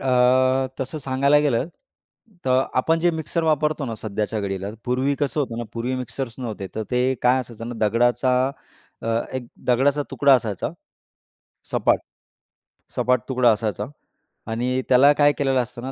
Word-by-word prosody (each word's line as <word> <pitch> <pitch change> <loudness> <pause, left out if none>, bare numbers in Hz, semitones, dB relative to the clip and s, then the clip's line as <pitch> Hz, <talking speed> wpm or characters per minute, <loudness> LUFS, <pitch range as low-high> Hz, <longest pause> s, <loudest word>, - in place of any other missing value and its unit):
अ, 130 +1 +3
तसं 135 +4 -3
सांगायला 140 +2 +3
गेलं, 140 0 +1 0.8
तर 130 0 +3
आपण 160 +6 +2
जे 175 +1 +3
मिक्सर 160 +1 -2
वापरतो 150 -1 +1
ना 115 - -3
सध्याच्या 105 0 -3
घडीला, 95 0 -3 0.2
पूर्वी 130 +3 +1
कसं 145 +1 0
होतं 120 -4 -3
ना, 120 - -3
पूर्वी 120 +3 -2
मिक्सर्स 130 -1 -5
नव्हते. 110 -6 -5
तर 110 - -2
ते 125 +1 +2
काय 125 +1 +4
असायचं 115 -1 -8
ना, 120 - -5
दगडाचा 120 +3 +2 0.7
अ, 115 - -3 0.3
एक 125 -2 -4 0.2
दगडाचा 135 +4 +3
तुकडा 140 -1 +5
असायचा, 110 -6 -1 1.0
सपाट. - - +2 1.0
सपाट 125 -2 +2
तुकडा 125 -2 +4
असायचा 105 -2 -2 0.7
आणि 125 +3 0
त्याला 135 +3 +7
काय 145 0 +4
केलेलं 135 -2 +2
असतं 120 0 -10
ना, 135 - -4
125 Hz, 150 wpm, -23 LUFS, 115-135 Hz, 1.0 s, त्याला